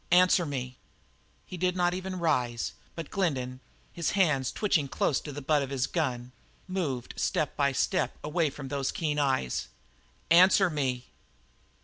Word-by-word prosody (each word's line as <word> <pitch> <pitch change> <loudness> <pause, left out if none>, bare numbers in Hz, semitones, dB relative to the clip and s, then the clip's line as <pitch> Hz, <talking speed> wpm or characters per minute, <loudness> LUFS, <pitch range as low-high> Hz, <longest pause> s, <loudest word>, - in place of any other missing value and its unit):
Answer 180 -1 +5
me!" 130 -3 -5 0.7
He 180 - -8
did 180 +1 0
not 175 -1 +2
even 185 0 -4
rise, 125 -9 0 0.2
but 165 -2 -7
Glendin, 130 -9 -1 0.3
his 170 - -1
hand 150 -9 +2
twitching 175 -9 +1
close 135 +1 0
to 150 - -7
the 145 0 -7
butt 150 +1 +3
of 135 - -3
his 135 -2 0
gun, 125 -7 -2 0.4
moved 155 -10 -3
step 150 - 0
by 140 -1 +2
step 180 +7 0
away 155 +1 +1
from 135 -1 -8
those 140 -1 -1
keen 150 -2 -1
eyes. 130 - 0 0.6
"Answer 185 +2 +6
me!" 130 -4 -1
150 Hz, 150 wpm, -29 LUFS, 130-175 Hz, 0.7 s, Answer